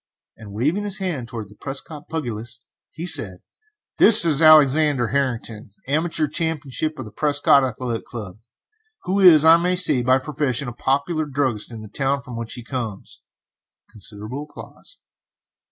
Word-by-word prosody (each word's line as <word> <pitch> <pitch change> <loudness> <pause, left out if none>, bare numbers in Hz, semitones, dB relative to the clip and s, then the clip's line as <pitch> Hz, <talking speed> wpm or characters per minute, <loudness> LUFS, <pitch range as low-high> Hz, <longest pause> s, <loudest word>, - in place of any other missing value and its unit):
Waving 115 - -3
his 205 -2 -1
hand 165 -11 -4
towards 115 -4 -8
the 105 - -17
Prescott 145 +5 -8
pugilist, 120 -6 -5 0.2
he 165 - -8
said: 115 - -1 0.6
"This 215 -5 +9
is 155 -2 +5
Alexander 150 -4 +4
Harrington, 120 -6 -3 0.2
amateur 155 +2 -1
champion 155 -3 -4 0.2
of 130 - -7
the 105 - -12
Prescott 145 0 +2
Athletic 125 -2 -4
Club, 105 -4 -9 0.6
who 190 +2 -1
is, 165 -5 +6
I 165 +1 +7
may 180 +2 -1
say, 170 -8 +3
by 130 +2 +2
profession 140 -2 -3
a 120 - -6
popular 140 +6 -2
druggist 130 -6 -3
in 110 -2 -9
the - - -10
town 135 +5 -2
from 125 -3 -10
which 115 +1 -5
he 120 - -9
comes. 115 -5 -7 0.7
[Considerable 110 +6 -9
applause. - - -14
135 Hz, 150 wpm, -21 LUFS, 115-155 Hz, 0.7 s, This